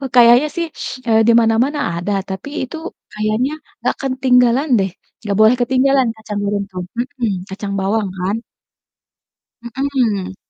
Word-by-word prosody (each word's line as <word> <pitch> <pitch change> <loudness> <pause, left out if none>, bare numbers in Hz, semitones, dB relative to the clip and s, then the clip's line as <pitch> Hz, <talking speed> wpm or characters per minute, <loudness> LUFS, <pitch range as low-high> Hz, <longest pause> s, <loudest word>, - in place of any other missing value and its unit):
kayaknya 240 +4 +7
sih, 340 -1 -1 0.4
eee, 220 -1 +4
di 235 - +7
mana-mana 240 +7 +2 0.2
ada, 175 +4 -3 0.2
tapi 190 +8 -5
itu 260 - -6 0.4
kayaknya 215 +5 0 0.3
nggak - - -1
ketinggalan 260 0 +3
deh, 195 - 0 0.3
nggak 205 -3 -2
boleh 220 +3 +6
ketinggalan 260 +1 +3
kacang 215 -2 -5
goreng 200 0 -1
tuh, 180 -1 -5 0.2
mhm, 245 -4 -2 0.2
kacang 200 +1 -5
bawang 205 +2 0
kan. 190 +4 -1 1.2
Mhm. 235 -6 -1
235 Hz, 130 wpm, -18 LUFS, 205-260 Hz, 1.2 s, kayaknya